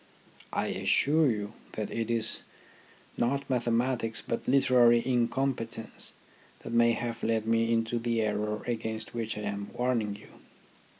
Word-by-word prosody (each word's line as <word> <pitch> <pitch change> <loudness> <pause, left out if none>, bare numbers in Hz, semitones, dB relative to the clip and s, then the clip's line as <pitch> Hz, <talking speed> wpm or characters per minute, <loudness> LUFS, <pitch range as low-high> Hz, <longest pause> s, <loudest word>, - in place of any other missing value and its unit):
I - - -1
assure 155 +1 +3
you 105 -2 -2 0.2
that 105 -2 -4
it 115 -1 -2
is 115 -1 0 0.8
not 140 +3 0
mathematics 120 -2 0
but 115 - -4
literary 125 -3 +5
incompetence 120 -2 -1 0.5
that 115 - -7
may 115 0 +5
have 115 0 -3
led 110 -1 0
me 115 0 +2
into 115 +1 +1
the 115 -1 0
error 105 0 -1
against 110 -2 -3
which 115 -2 -3
I - - -4
am 100 -1 -4
warning 120 -5 0
you. - - -15
115 Hz, 135 wpm, -29 LUFS, 110-120 Hz, 0.8 s, literary